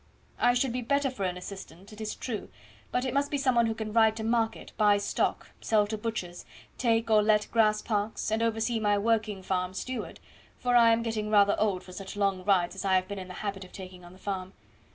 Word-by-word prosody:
I 245 0 +4
should 245 -1 +1
be 250 - -2
better 280 +2 +1
for 200 -6 -3
an 180 -1 -2
assistant, 190 +1 -10
it 215 - -10
is 215 - -3
true, 225 -5 -5 0.4
but 250 +1 0
it 255 - -2
must 280 +1 +1
be 290 - -1
some 270 -2 +2
one 235 -1 +3
who 225 - -1
can 215 -1 -5
ride 220 -1 +5
to 220 - -4
market, 225 0 -1
buy 210 -1 +4
stock, 200 - -1
sell 215 -2 +3
to 215 +1 -3
butchers, 210 -5 -4 0.4
take 230 -2 +1
or 215 -1 +6
let 210 0 +3
grass 215 -2 +3
parks, 215 0 -2
and 220 +1 +1
oversee 225 0 0
my 205 -1 +2
working 215 -2 0
farm 185 0 -2
steward, 255 +5 -5 0.4
for 245 0 0
I 235 -1 +7
am 230 0 +3
getting 220 -2 -2
rather 205 -1 +5
old 200 -4 +1
for 185 - -12
such 190 +1 -8
long 195 -2 0
rides 180 -3 +2
as 195 - -6
I 190 -1 +3
have 185 0 +1
been 200 0 -5
in 185 - -7
the 185 - -9
habit 195 -1 -3
of 185 - -14
taking 185 -2 -10
on 175 +1 -13
the - - -15
farm. 190 -1 -5
215 Hz, 235 wpm, -28 LUFS, 195-230 Hz, 0.4 s, I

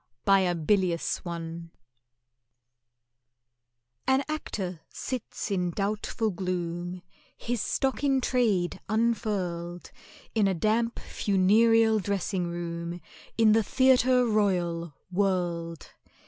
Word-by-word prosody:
BY 195 0 +6
A 180 -2 +1
BILIOUS 175 0 +1
ONE 170 -1 -6 2.4
AN 265 +1 +3
Actor 190 - -4
sits 250 -4 -5
in 180 -2 0
doubtful 210 +4 -1
gloom, 175 -1 -4 0.3
His 240 -2 -2
stock 270 +1 -1
in 270 -2 +3
trade 225 -9 +1
unfurled, 200 -6 -1 0.4
In 215 -3 +3
a 190 - +1
damp 225 +6 +1
funereal 220 +3 +3
dressing 195 -2 -1
room 170 0 -4 0.4
In 225 -2 +5
the 225 +1 +5
Theatre 255 +2 +4
Royal, 175 -7 0 0.2
World. 175 -4 -1
195 Hz, 95 wpm, -28 LUFS, 175-225 Hz, 2.4 s, BY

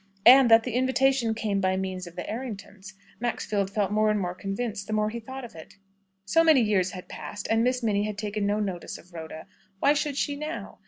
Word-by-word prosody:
And 255 0 +9
that 225 0 +7
the 250 - -4
invitation 260 -2 +2
came 210 -3 -1
by 190 0 +1
means 185 -1 -4
of 170 - -12
the 180 - -4
Erringtons, 205 -4 -7 0.3
Maxfield 210 -4 -1
felt 200 -1 -1
more 215 +1 +3
and 210 0 +1
more 180 -2 -2
convinced, 200 +2 -4
the 215 - -3
more 215 0 +1
he 235 - -5
thought 260 +3 -8
of 235 - -12
it. 160 -1 -12 0.5
So 330 +12 +4
many 315 -5 +6
years 200 -4 +2
had 185 -1 -9
passed, 205 -1 -7
and 225 +1 +3
Miss 250 0 0
Minnie 205 -2 +1
had 210 -1 -4
taken 210 -1 -2
no 205 +1 +1
notice 190 -4 -4
of 180 +1 -18
Rhoda. 160 -1 -8 0.3
Why 285 - +4
should 290 -1 -2
she 285 - 0
now? 305 +3 -6
215 Hz, 220 wpm, -26 LUFS, 195-245 Hz, 0.5 s, And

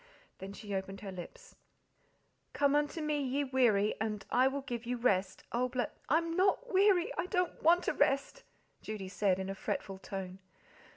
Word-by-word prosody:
Then 195 +1 -7
she 205 0 -7
opened 195 0 -4
her 200 -2 -6
lips: 475 - -10 1.0
"Come 285 0 +3
unto 295 +2 0
Me, 300 -1 0
ye 275 +1 0
weary, 240 -6 +3
And 210 -2 -2
I 255 +2 +5
will 280 +1 -2
give 240 -3 -5
you 250 0 -1
rest, 195 -6 +1
Oh, 250 +2 0
bl 250 0 -1 0.3
"I'm 330 +3 +2
not 395 +6 +2
weary, 380 -2 +4
I - - 0
don't 360 -2 -1
WANT 345 +2 +5
to - - 0
rest," 275 - +1 0.4
Judy 205 -3 -5
said, 195 -1 +1
in 190 0 -4
a 195 - -3
fretful 195 -1 -4
tone. 190 -1 -6
250 Hz, 175 wpm, -33 LUFS, 195-305 Hz, 1.0 s, I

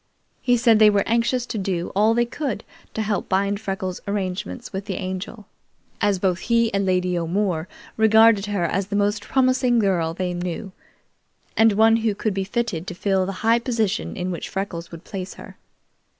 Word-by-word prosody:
He 245 -1 +3
said 230 -2 +4
they 215 -1 +8
were 200 -1 +2
anxious 235 +2 +1
to 225 - -4
do 185 -3 -2
all 215 +3 +4
they 240 0 +3
could 265 +1 -4 0.3
to 220 - -1
help 205 -1 -2
bind 200 +2 +1
Freckles' 190 -3 -4
arrangements 185 - -4
with 190 +1 -4
the 195 - -3
Angel, 190 +3 -5 0.6
as 205 -1 +2
both 185 -1 0
he 230 -1 +1
and 195 -1 0
Lady 180 -1 +1
O'More 175 0 -1 0.3
regarded 220 -1 +5
her 200 -4 -1
as 185 +3 -1
the 200 - -3
most 205 0 +1
promising 255 -1 +2
girl 175 -6 +1
they 180 -1 -2
knew, 175 +3 -4 0.8
and 225 -1 +5
one 225 +2 +5
who 220 -2 0
could 215 0 -1
be 195 0 -1
fitted 195 -4 -2
to 180 - -5
fill 190 0 +1
the - - -2
high 230 +1 +5
position 230 -5 -1
in 185 0 -2
which 175 - -5
Freckles 190 -4 -4
would 170 +1 -10
place 190 -2 -6
her. - - -12
200 Hz, 185 wpm, -23 LUFS, 185-225 Hz, 0.8 s, they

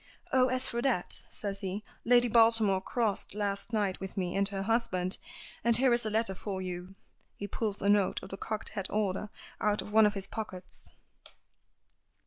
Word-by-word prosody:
"Oh, 255 -1 +5
as 255 0 +1
for 235 0 -2
that," 240 -9 +1
says 200 -2 -4
he, 195 +2 -3 0.2
"Lady 245 +1 +5
Baltimore 225 -4 +4
crossed 210 -2 -1
last 205 +1 -2
night 205 -4 0
with 190 0 -7
me 180 -2 -1
and 200 0 +3
her 195 -1 -3
husband. 195 -5 0 0.4
And 235 -1 +4
here 255 -1 +4
is 235 -1 +2
a - - 0
letter 220 -2 +1
for 190 0 -4
you." 185 0 -5 0.4
He 205 - -5
pulls 205 -1 -2
a - - +2
note 205 -1 +3
of 190 - -8
the 195 - -5
cocked 215 +1 -3
hat 195 -3 -4
order 210 0 -1 0.3
out 210 0 +1
of - - -10
one 220 0 +7
of 210 - -2
his 195 -1 -3
pockets. 190 -4 -6
205 Hz, 185 wpm, -31 LUFS, 195-225 Hz, 0.4 s, one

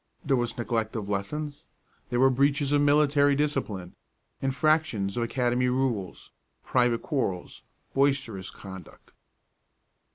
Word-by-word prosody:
There 140 -2 +3
was 120 0 -2
neglect 115 -2 -1
of 105 -3 -4
lessons; 145 +9 -3 0.4
there 120 - 0
were 135 +1 +6
breaches 140 +2 +2
of 145 0 +4
military 145 -1 +4
discipline, 135 -11 -2 0.5
infractions 135 -7 +1
of 120 - -1
academy 125 +1 +1
rules, 125 -7 -2 0.3
private 120 -2 +1
quarrels, 115 - -2 0.3
boisterous 135 -9 0
conduct. 95 -3 -12
125 Hz, 110 wpm, -27 LUFS, 110-145 Hz, 0.5 s, were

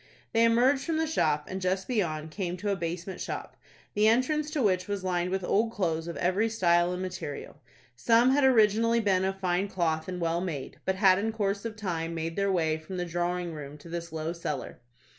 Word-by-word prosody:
They 230 0 +5
emerged 255 +4 +4
from 325 -2 0
the 320 - +1
shop, 150 - +1
and, 190 +1 -5
just 185 +1 -1
beyond, 160 -10 -1
came 180 -1 -3
to 205 +3 -2
a - - +1
basement 175 +1 -4
shop, - - -5 0.4
the 210 +1 +3
entrance 290 +7 +2
to 300 -4 -1
which 185 -3 +1
was 200 -2 -3
lined 180 -1 0
with 190 0 -2
old 225 +5 +1
clothes 165 -5 -1
of 170 - -5
every 195 +6 +1
style 175 -5 +3
and 180 +1 -3
material. 150 -4 -6 0.3
Some 230 - +4
had 285 +1 +3
originally 230 -2 +4
been 195 -4 +2
of 190 0 -2
fine 185 +1 0
cloth 160 -4 -1
and 180 -1 -4
well 170 0 0
made, 160 -7 -5
but 190 - +1
had 190 -1 +5
in 220 +2 -1
course 200 -1 -1
of 225 -2 -4
time 170 -6 -3
made 165 0 -3
their 200 0 +1
way 160 -3 +1
from 170 +4 -7
the 180 - -1
drawing 175 0 -2
room 150 -1 -8
to 160 +3 -13
this 170 0 -5
low 160 +1 -3
cellar. 150 -6 -5
185 Hz, 215 wpm, -28 LUFS, 170-215 Hz, 0.4 s, They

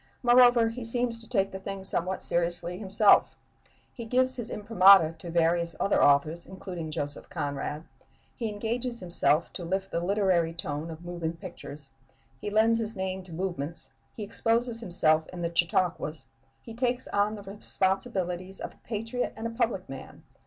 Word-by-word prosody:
Moreover, 245 -1 +6
he 235 +2 -6
seems 235 0 -2
to 230 -1 -13
take 195 -5 +1
the 190 - -6
thing 195 0 -6
somewhat 185 0 -2
seriously 175 +1 -1
himself. 205 +1 +4 0.6
He 235 - -7
gives 255 +3 +3
his 235 -2 -4
imprimatur 195 -6 +6
to 170 - -8
various 170 0 +1
other 200 - +3
authors, 150 +4 +3
including 180 -4 -6
Joseph 145 -2 -2
Conrad; 145 +2 -3 0.5
he 230 -2 -3
engages 235 +3 -3
himself 170 -3 +1
to 180 - -6
lift 190 +3 -2
the - - 0
literary 175 -3 +1
tone 160 -3 -4
of 165 +1 -9
moving 170 -2 -3
pictures; 155 -5 -10 0.5
he 205 - -4
lends 225 +2 +3
his 225 0 -4
name 190 0 -3
to 180 - -13
movements; 165 -3 -3 0.3
he 215 - -4
exposes 230 +3 0
himself 160 -5 +2
in 175 -1 -6
the 170 0 -2
chautauquas; 165 -2 +1 0.4
he 230 - -9
takes 245 +1 -1
on 205 +1 +1
the 205 - -9
responsibilities 190 -2 -2
of - - -6
a - - -26
patriot 230 +3 -3
and 225 - -6
a 230 - -2
public 230 -5 -1
man.... 135 -1 -10
190 Hz, 165 wpm, -28 LUFS, 170-225 Hz, 0.6 s, Moreover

